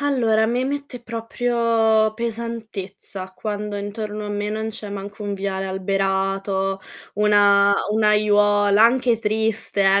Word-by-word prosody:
Allora, 230 -6 +2
mi 245 +3 0
mette 280 -2 -4
proprio 230 -1 +1
pesantezza, 220 -4 -5
quando 210 +1 -4
intorno 210 +1 -5
a - - -5
me 205 0 -2
non 220 +1 -3
c'è 220 -1 -7
manco 200 +1 -7
un 205 0 -2
viale 195 -1 -3
alberato, 195 0 -1 0.3
una 205 -1 +4 0.2
un'aiuola 210 -1 +3
anche 235 -1 +3
triste, 220 -1 -1
eh, 195 0 +4
210 Hz, 120 wpm, -22 LUFS, 200-225 Hz, 0.3 s, una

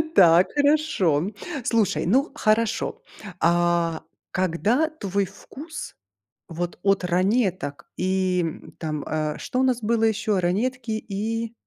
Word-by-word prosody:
Так, 175 0 +7
хорошо, 285 - +2 0.3
слушай, 215 -7 +1
ну 265 - +2
хорошо. 215 +1 0 0.4
А 170 -1 +2 0.3
когда 205 - +1
твой 200 - -2
вкус 310 - -9 0.5
вот 175 +1 -4
от 195 -1 +2
"Ранеток" 185 - 0
и, 185 -1 +1
м, 160 - -6
там, 155 -3 -3
э, 155 -1 -2
что 255 - -2
у - - +3
нас 255 -2 +2
было 225 +1 +1
ещё? 215 -2 +1
"Ранетки" 230 +7 -1
и 220 +2 -3
195 Hz, 120 wpm, -24 LUFS, 175-230 Hz, 0.5 s, Так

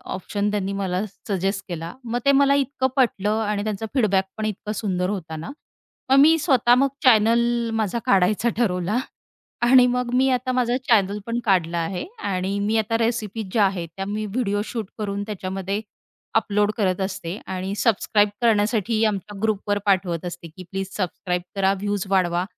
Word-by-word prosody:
Option 205 +2 -2
त्यांनी 200 -1 -2
मला 195 0 -1 0.2
suggest 195 +1 -1
केला. 170 -1 -5
मग 240 +1 -2
ते 280 - +6
मला 280 0 +4
इतकं 275 -1 0
पटलं 215 -5 +1
आणि 205 -1 -1
त्यांचा 215 0 -3
फीडबॅक 200 -7 +2
पण 215 - -2
इतका 210 0 -4
सुंदर 185 -3 -1
होता 170 -6 -4
ना. 160 - -6 0.6
मग 270 - +5
मी 320 +3 +7
स्वतः 255 -6 +4
मग 275 +2 +3 0.2
चॅनल 235 0 +4
माझा 220 +1 -1
काढायचा 200 +5 +3
ठरवला. 195 -1 0 0.6
आणि 250 +1 +6
मग 250 0 -1
मी 265 +1 +3
आता 255 0 0
माझा 250 -1 +1
चॅनल 205 -2 +3
पण 235 +1 -2
काढला 175 -4 +2
आहे 180 - -2 0.3
आणि 190 +2 -1
मी 215 +2 +1
आता 225 +1 +1
रेसिपीज 225 -3 -2
ज्या 210 -1 +4
आहेत, 185 -3 -2
त्या 195 - -3
मी 210 +1 -3
व्हिडिओ 205 -1 -1
शूट 225 -2 -4
करून 200 -1 -3
त्याच्यामध्ये 195 0 -4 0.5
अपलोड 210 -1 +2
करत 190 -3 0
असते 190 -1 -4
आणि 190 +1 -3
सबस्क्राईब 210 -1 +2
करण्यासाठी 220 0 +2
आमच्या 205 -1 -2
ग्रुपवर 205 -1 0
पाठवत 180 -4 +1
असते 175 -1 -7
की 175 +4 -12
प्लीज 195 0 -3
सबस्क्राईब 180 -1 -2
करा. 195 0 +2
व्ह्यूज 205 0 -2
वाढवा 180 -2 +2
205 Hz, 165 wpm, -23 LUFS, 190-230 Hz, 0.6 s, मी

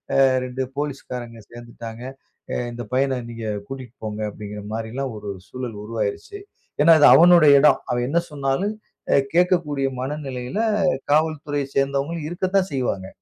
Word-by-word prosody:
அ - - +4 0.3
2 130 +1 -3
police 145 -2 -3
காரங்க 120 -2 -6
சேந்துட்டாங்க. 120 -1 -9 0.5
அ - - -1 0.2
"இந்த 120 0 -6
பையன 135 0 +1
நீங்க 115 -1 -7 0.2
கூட்டிட்டு 130 -3 -8
போங்க." 105 0 -4
அப்டிங்கற 105 0 -8
மாரிலாம் 115 +4 -4
ஒரு 105 -1 -7 0.2
சூழல் 120 -2 -6
உருவாகிறிச்சு. 110 - -4 0.4
ஏன்னா, 165 +3 +8
அது 145 - +8
அவனுடைய 160 -3 +7
இடம். 140 -2 +5
அவன் 120 0 0
என்ன 170 +4 +2
சொன்னாலும், 145 +9 -1 0.4
அ - - +6 0.2
கேட்கக்கூடிய 170 -6 +2
மனநிலையில 135 +2 -4 0.5
காவல்துறைய 150 -2 +1
சேர்ந்தவங்க 140 +4 0
இருக்கத்தான் 185 +2 0
செய்வாங்க. 120 -8 -2
135 Hz, 135 wpm, -22 LUFS, 120-150 Hz, 0.5 s, ஏன்னா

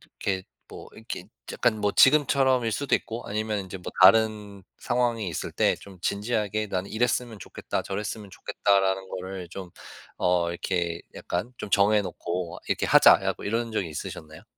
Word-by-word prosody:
이렇게 95 -1 -4 0.3
뭐 - - -10
이렇게 - - -8 0.2
약간 110 -4 +1
뭐 105 0 +1
지금처럼일 135 -4 +4
수도 140 +3 0
있고 115 +1 -3
아니면 105 0 -2
인제 95 0 -7
뭐 90 - -7
다른 105 -1 +4 0.2
상황이 120 -4 0
있을 80 - -4
때 - - +2
좀 95 -2 -13
진지하게 105 +1 -1
나는 95 0 -3
이랬으면 120 -1 0
좋겠다, 90 - -4
저랬으면 105 0 -5
좋겠다라는 95 -1 0
거를 95 -1 -6
좀 90 0 -8 0.5
어 90 -1 +2
이렇게 85 -1 -2
약간 100 +9 -4
좀 100 - -6
정해 105 +1 +4
놓고 85 -2 -4
"이렇게 - - 0
하자!"라고 - - +5
이런 115 +2 -1
적이 95 -6 -1
있으셨나요? 75 +1 -8
100 Hz, 355 characters per minute, -26 LUFS, 95-110 Hz, 0.5 s, 하자!"라고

